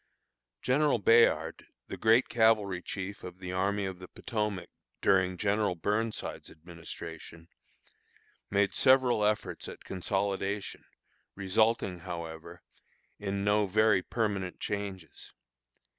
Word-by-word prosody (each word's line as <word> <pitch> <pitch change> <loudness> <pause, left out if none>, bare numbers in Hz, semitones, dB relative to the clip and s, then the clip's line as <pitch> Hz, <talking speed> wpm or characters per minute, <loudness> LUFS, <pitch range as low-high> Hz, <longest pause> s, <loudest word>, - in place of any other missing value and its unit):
General 140 +2 +3
Bayard, 115 +3 +3 0.2
the - - -6
great 115 +3 +4
cavalry 110 -5 +2
chief 100 +2 -6
of 90 0 -8
the 90 -1 -6
Army 100 +2 0
of 95 -2 -5
the 90 - -10
Potomac 105 -5 -4 0.3
during 95 -1 +2
General 100 -1 +1
Burnside's 105 +6 -2
administration, 80 0 -10 1.0
made 100 0 +2
several 130 -4 +4
efforts 105 0 -1
at - - -10
consolidation, 95 +1 -2 0.5
resulting, 100 -1 +1
however, 85 -1 -7 0.6
in 100 -1 -2
no 105 0 +3
very 105 0 +3
permanent 100 -3 -2
changes. 100 -4 -6
100 Hz, 105 wpm, -30 LUFS, 90-105 Hz, 1.0 s, great